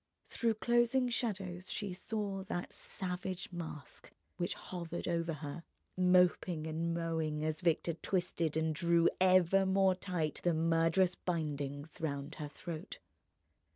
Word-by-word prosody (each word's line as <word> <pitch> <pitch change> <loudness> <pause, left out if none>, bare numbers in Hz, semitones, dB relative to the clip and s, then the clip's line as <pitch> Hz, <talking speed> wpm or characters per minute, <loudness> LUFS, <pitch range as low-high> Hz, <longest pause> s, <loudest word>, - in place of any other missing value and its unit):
Through 230 -2 +1
closing 240 +3 +3
shadows 190 -6 -2
she 200 -3 -3
saw 200 0 -3
that 175 -2 -4
savage 185 0 -4
mask 160 -5 -7 0.3
which 175 -1 -1
hovered 170 -2 -5
over 170 -1 0
her, 150 +2 -6 0.3
moping 180 -2 +3
and 160 +1 -1
mowing, 160 -2 -1
as 155 +1 -1
Victor 170 -1 +2
twisted 170 -2 -1
and 160 0 +1
drew 170 +1 +4
ever 185 0 +5
more 190 0 +4
tight 180 -5 -2
the 175 -2 +3
murderous 165 +3 +3
bindings 145 -4 -3
round 140 -1 -2
her 150 - -3
throat. 170 +4 -7
175 Hz, 125 wpm, -34 LUFS, 160-185 Hz, 0.3 s, ever